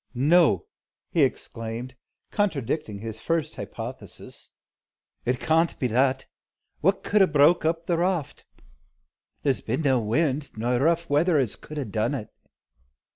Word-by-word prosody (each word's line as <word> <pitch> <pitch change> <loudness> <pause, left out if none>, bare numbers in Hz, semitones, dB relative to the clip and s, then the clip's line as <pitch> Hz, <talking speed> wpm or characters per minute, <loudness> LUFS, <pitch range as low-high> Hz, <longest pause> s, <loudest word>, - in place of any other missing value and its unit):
"No!" 165 - +4 0.5
he 170 - +2
exclaimed, 120 -2 -2 0.4
contradicting 150 - -1
his 110 +1 -7
first 165 -3 -1
hypothesis, - - -8 0.8
"It 125 +1 0
can't 165 +1 +2
be - - -2
that. 130 +3 +2 0.5
What 195 +4 +1
could 210 0 +3
'a 190 - +6
broke 155 +2 +4
up 165 +1 0
the 170 -1 0
raft? 175 -5 -1 1.0
There 140 - +3
's - - -10
been 130 +8 -2
no 135 -3 +3
wind, 140 +4 -1
nor 120 +2 0
rough 170 +4 +2
weather, 155 +3 +3
as 130 -7 +1
could 155 - -10
'a 145 - -2
done 110 +5 -1
it. 110 -6 -6
145 Hz, 140 wpm, -25 LUFS, 125-165 Hz, 1.0 s, a